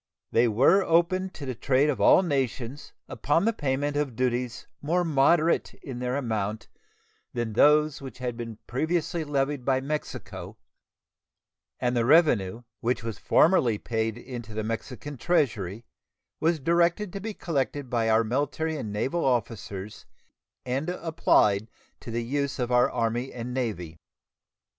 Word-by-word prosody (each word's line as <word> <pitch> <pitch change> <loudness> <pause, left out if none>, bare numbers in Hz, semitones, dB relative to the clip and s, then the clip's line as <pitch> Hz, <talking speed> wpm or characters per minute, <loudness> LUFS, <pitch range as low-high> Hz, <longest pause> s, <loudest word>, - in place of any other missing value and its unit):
They 120 +1 +4
were 135 - +4
opened 185 +2 +1
to 145 - -7
the 130 - -3
trade 135 +4 +2
of 150 - -1
all 190 - +6
nations 135 -3 -2 0.2
upon 145 - +1
the 230 - +2
payment 145 -3 -1
of 145 -5 -1
duties 125 0 -1 0.2
more 175 +5 +1
moderate 160 +2 +2
in 130 -3 -8
their 125 +1 -1
amount 110 -5 -2 0.7
than 120 -2 -2
those 150 +4 +4
which 135 -1 -8
had 125 -2 -3
been 115 -2 -7
previously 160 +4 -1
levied 140 -2 -1
by 130 +1 +2
Mexico, 150 +3 -5 1.2
and 125 0 0
the 120 - +2
revenue, 120 - +3 0.2
which 120 0 -1
was 115 -3 -5
formerly 135 - +4
paid 110 0 -2
into 120 -3 -8
the 110 - -2
Mexican 125 +5 -5
treasury, 115 - 0 0.5
was 165 0 +2
directed 170 +6 +1
to 200 - -4
be 210 +1 -5
collected 145 -4 -2
by 115 -2 0
our 110 +1 +4
military 145 +6 -1
and 110 -7 -5
naval 130 +11 -1
officers 105 -5 -2 0.6
and 135 +6 -2
applied 135 - +2 0.3
to - - -10
the 115 +1 -2
use 140 +3 -2
of 125 -1 -2
our 125 0 +4
Army 120 +3 -1
and 125 0 -6
Navy. 90 -11 -3
130 Hz, 145 wpm, -27 LUFS, 115-150 Hz, 1.2 s, all